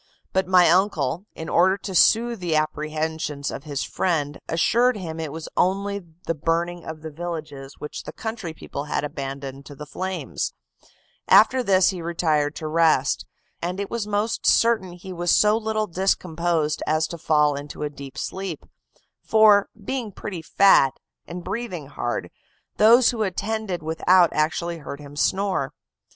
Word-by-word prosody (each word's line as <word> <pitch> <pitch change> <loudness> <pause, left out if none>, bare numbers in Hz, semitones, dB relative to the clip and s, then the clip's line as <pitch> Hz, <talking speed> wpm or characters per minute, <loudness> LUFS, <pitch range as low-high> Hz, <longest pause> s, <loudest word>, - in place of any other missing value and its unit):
But 190 -1 +1
my 180 -1 +6
uncle, 175 -2 +1
in 160 - -7
order 190 +3 +3
to 195 -1 -7
soothe 230 +5 +4
the 175 -3 -1
apprehensions 155 -1 -2
of 135 - -7
his 145 -2 -3
friend, 150 -5 -1
assured 235 +9 +2
him 165 -4 -6
it 160 -3 -4
was 160 +1 -7
only 200 +2 0 0.2
the - - 0
burning 170 +2 -1
of 160 0 -8
the 160 - -6
villages, 150 -4 -6
which 150 - -7
the - - -8
country 220 -6 -5
people 145 -2 -7
had 150 - -2
abandoned 140 -1 -6
to 145 - -10
the 150 - -8
flames; 185 +5 -4 0.7
after 260 - +6
this 190 -5 +4
he 185 -3 -4
retired 155 -3 0
to 155 - -5
rest, 155 -3 +2 0.3
and 180 +3 -3
it 200 - -4
was 230 -3 -2
most 210 +2 -1
certain 220 -6 +3
he 180 +1 -9
was 175 0 -2
so 210 +4 +5
little 220 -1 -1
discomposed 170 -4 0
as 155 +1 +2
to 170 +1 -7
fall 150 -2 +3
into 145 +1 -6
a 150 - -1
deep 140 -2 -10
sleep; 190 -4 -5 0.6
for, 215 -2 +5 0.2
being 250 -4 -3
pretty 190 -2 -6
fat, 160 -7 +4 0.3
and 175 +1 -7
breathing 195 -6 -4
hard, 120 -3 -4 0.5
those 230 +3 +6
who 235 -3 -4
attended 205 -2 -2
without 170 +2 +3
actually 165 +2 -1
heard 140 -1 -7
him 145 -1 -11
snore. 190 -2 0
170 Hz, 160 wpm, -23 LUFS, 155-195 Hz, 0.7 s, my